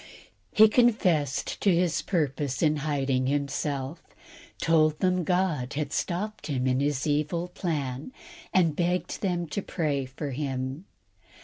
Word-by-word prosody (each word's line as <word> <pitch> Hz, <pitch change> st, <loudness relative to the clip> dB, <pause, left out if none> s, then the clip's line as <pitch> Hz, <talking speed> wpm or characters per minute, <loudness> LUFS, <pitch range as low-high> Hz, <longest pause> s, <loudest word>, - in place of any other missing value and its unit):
He 220 Hz, 0 st, +7 dB
confessed 185 Hz, -, +2 dB
to 200 Hz, -, +4 dB
his 170 Hz, -1 st, +2 dB
purpose 145 Hz, -6 st, -1 dB
in 155 Hz, -1 st, +3 dB
hiding 135 Hz, -3 st, 0 dB
himself, 140 Hz, +1 st, -2 dB, 0.6 s
told 155 Hz, -2 st, +3 dB
them 185 Hz, -1 st, +1 dB
God 170 Hz, -7 st, 0 dB
had 145 Hz, -1 st, -3 dB
stopped 210 Hz, +5 st, -2 dB
him 130 Hz, -4 st, -1 dB
in 130 Hz, 0 st, +2 dB
his 140 Hz, -1 st, 0 dB
evil 155 Hz, +4 st, 0 dB
plan, 150 Hz, -, -3 dB, 0.4 s
and 165 Hz, -5 st, +3 dB
begged 180 Hz, +2 st, -1 dB
them 175 Hz, -3 st, 0 dB
to 200 Hz, -, -2 dB
pray 150 Hz, -8 st, -1 dB
for 140 Hz, +2 st, -5 dB
him. 135 Hz, +3 st, -3 dB
150 Hz, 130 wpm, -27 LUFS, 140-175 Hz, 0.6 s, He